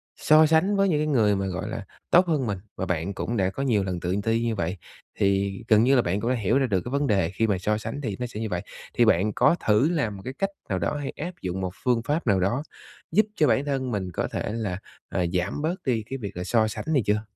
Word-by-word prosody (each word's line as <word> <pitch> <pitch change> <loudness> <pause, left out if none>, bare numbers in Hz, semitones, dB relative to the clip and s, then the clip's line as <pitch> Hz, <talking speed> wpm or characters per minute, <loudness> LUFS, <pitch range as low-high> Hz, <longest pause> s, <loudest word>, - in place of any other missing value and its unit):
so 155 +1 +5
sánh 160 +6 +3
với 195 0 +3
những 150 -4 +2
cái 155 - 0
người 110 -8 +3
mà, 95 0 -1
gọi 95 +3 -4
là, 110 -2 -5 0.2
tốt 180 +1 +5
hơn 150 -7 0
mình 100 -2 -1 0.2
và 95 - -3
bạn 90 +1 -2
cũng 115 +4 -3
đã 95 -1 +2
có 135 - -4
nhiều 110 -7 +2
lần 90 -2 -3
tự 90 +2 -1
ti 115 +1 +1
như 115 -1 0
vậy, 90 0 -2 0.4
thì 100 0 +1
gần 110 -2 +5
như 135 +3 +4
là 125 - +5
bạn 95 0 -1
cũng 115 - -1
đã 130 - +2
hiểu 110 +2 +1
ra 135 - +2
được 95 -5 +1
cái - - -4
vấn 140 +1 +1
đề 95 -6 +2
khi 110 +5 0
mà 100 -3 +1
so 105 +4 0
sánh 115 +6 -5
thì 110 -8 -3
nó 125 - -2
sẽ 115 -3 -7
như 110 -1 -3
vậy, 90 -1 -2 0.3
thì 120 - +4
bạn 105 0 +3
có - - +4
thử 110 +8 +4
làm 145 -12 -1
một - - -10
cái 130 - -4
cách 195 +7 -1 0.2
nào 95 -2 0
đó 85 - -1
hay 145 -2 -4
áp 175 +4 -4
dụng 95 +1 -3
một 90 -1 -2
phương 120 -2 +2
pháp 150 0 -1
nào 100 -3 +4
đó 100 +10 0 0.5
giúp 215 +1 +4
cho 155 - +3
bản 135 +2 +2
thân 135 -3 -1
mình 95 -4 -2
có - - -2
thể - - -3
là, 105 -6 -2 0.3
ờ, 90 -2 0
giảm 90 +10 -1
bớt 160 +4 0
đi 120 -5 +1
cái 135 - -3
việc 100 -7 -7
là 90 - -3
so 110 +2 +2
sánh 110 - -5
này 135 - +3
chưa? 105 +1 +2
110 Hz, 285 wpm, -25 LUFS, 95-135 Hz, 0.5 s, so